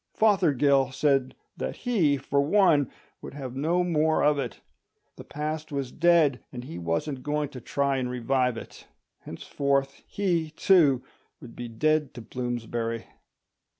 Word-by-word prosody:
Fothergill 145 - +3
said 135 -1 +1 0.2
that 65 0 -4
he, 175 -13 +1
for 140 +1 0
one, 150 -4 +3 0.3
would - - -9
have 130 -3 -6
no 165 +6 +1
more 160 -2 +2
of 150 -1 +3
it. 125 -4 -4 0.6
The - - -10
past 155 +1 -5
was 140 -3 -3
dead, 165 -6 +3
and 120 -1 -7
he 85 -9 -7
wasn't 85 - -2
going 150 +1 -2
to 130 -4 -10
try 140 +2 0
to 125 - -2
revive 125 0 0
it. - - -11 0.3
Henceforth 140 -1 -2
he, 175 -6 -1
too, 155 -5 +4 0.4
would 120 -2 -12
be 120 - -6
dead 150 +4 0
to 120 - -7
Bloomsbury. 120 -2 -4
140 Hz, 145 wpm, -26 LUFS, 125-155 Hz, 0.6 s, too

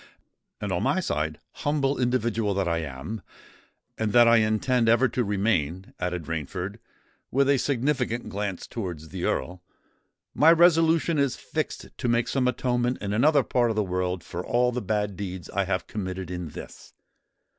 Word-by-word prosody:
"And, - - -3
on - - 0
my - - +2
side—humble 135 - -2
individual 115 -4 0
that 95 -2 0
I 85 -1 +1
am, 75 +8 -6 0.8
and 110 -2 0
that 120 -1 +7
I 115 0 +7
intend 115 +2 +2
ever 120 +3 +5
to 125 - 0
remain," 100 - -1
added 90 -2 -2
Rainford, 90 +7 -4 0.5
with 140 +1 +2
a 140 -1 +4
significant 130 -3 0
glance 100 -2 -4
towards 85 -8 -6
the 90 0 -4
Earl, 90 +6 -2 0.7
"my 155 +5 +6
resolution 165 -1 +4
is 140 -3 +1
fixed - - -5
to - - -3
make 120 0 +2
some 130 -2 +1
atonement 125 0 0
in 100 0 -3
another 140 +5 +4
part 120 -1 +1
of 110 - -1
the 105 - +2
world 90 -1 -2
for 85 +1 -5
all 125 +4 +2
the 125 0 -3
bad 105 0 -1
deeds 95 -3 -6
I 100 0 0
have 95 -2 -1
committed 95 -3 -5
in 90 -2 -4
this. - - -11
110 Hz, 165 wpm, -26 LUFS, 90-125 Hz, 0.8 s, that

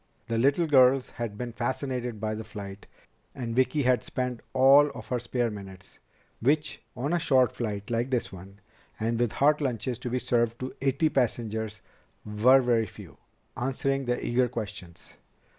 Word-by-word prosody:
The 115 -1 0
little 140 +7 +3
girls 130 -3 +4
had 115 -4 -5
been 120 0 -5
fascinated 125 -1 -3
by 110 0 -2
the 110 +1 -5
flight, 100 -2 -9 0.5
and 115 -3 -4
Vicki 130 +3 +2
had 125 -1 +2
spent 125 -2 -3
all 135 +3 +6
of - - -9
her 125 - 0
spare 120 -1 -1
minutes 95 -2 -11 0.4
which 150 +5 0 0.2
on 140 +7 -1
a 175 - +2
short 130 -6 +3
flight 105 -2 -4
like 120 +2 0
this 125 -3 -1
one, 95 +2 -12 0.4
and 115 +1 -1
with 120 -3 +1
hot 150 +2 +3
lunches 125 -2 -2
to 125 - -4
be 125 - -1
served 120 -1 0
to 130 +1 -5
eighty 135 +3 +2
passengers, 110 -6 -1 0.4
were 115 +6 +5
very 120 -3 +2
few - - -13 0.4
answering 135 +2 -1
their 125 0 0
eager 125 +1 +1
questions. 100 -7 -7
120 Hz, 165 wpm, -27 LUFS, 110-130 Hz, 0.5 s, all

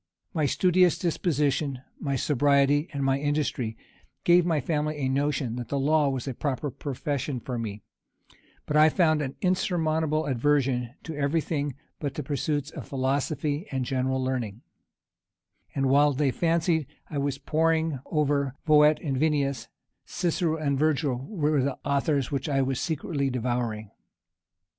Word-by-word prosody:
My 155 -3 +1
studious 180 +2 +3
disposition, 145 -5 0 0.2
my 140 -1 -1
sobriety, 145 +2 +2
and 140 -2 -3
my 135 0 +2
industry, 145 -6 -1 0.5
gave 175 0 +5
my 160 -3 +2
family 150 +1 -1
a 135 -3 -1
notion 135 -3 0
that 120 -2 -5
the 140 - -2
law 145 +1 +3
was 135 -1 -3
a 135 - -2
proper 140 +2 -2
profession 140 -1 -3
for 120 0 -4
me; 105 -2 -5 0.8
but 150 - -2
I 155 +1 +7
found 155 -2 +2
an 135 -2 -4
insurmountable 160 -4 +1
aversion 130 -2 +1
to 160 - -6
every 145 +3 +1
thing 145 -3 -2 0.2
but 145 -3 -3
the 150 - -3
pursuits 145 +1 -2
of - - -8
philosophy 145 +5 -1
and 130 -2 -1
general 130 0 0
learning; 120 -4 -3 1.1
and 135 - +1
while 145 +2 +4
they 135 0 +1
fancied 165 -1 +1 0.2
I 145 - -2
was 140 -1 -1
poring 160 0 +1
upon 145 -4 0
Voet 150 -1 +6
and 140 -4 -1
Vinnius, 140 -4 0 0.4
Cicero 170 -2 0
and 140 -3 0
Virgil 145 -4 0
were 150 -7 +1
the 135 0 -1
authors 140 -1 +1
which 140 +2 -2
I 135 -1 +2
was 130 -1 -1
secretly 145 -3 -1
devouring. 120 -4 -2
145 Hz, 150 wpm, -27 LUFS, 135-155 Hz, 1.1 s, I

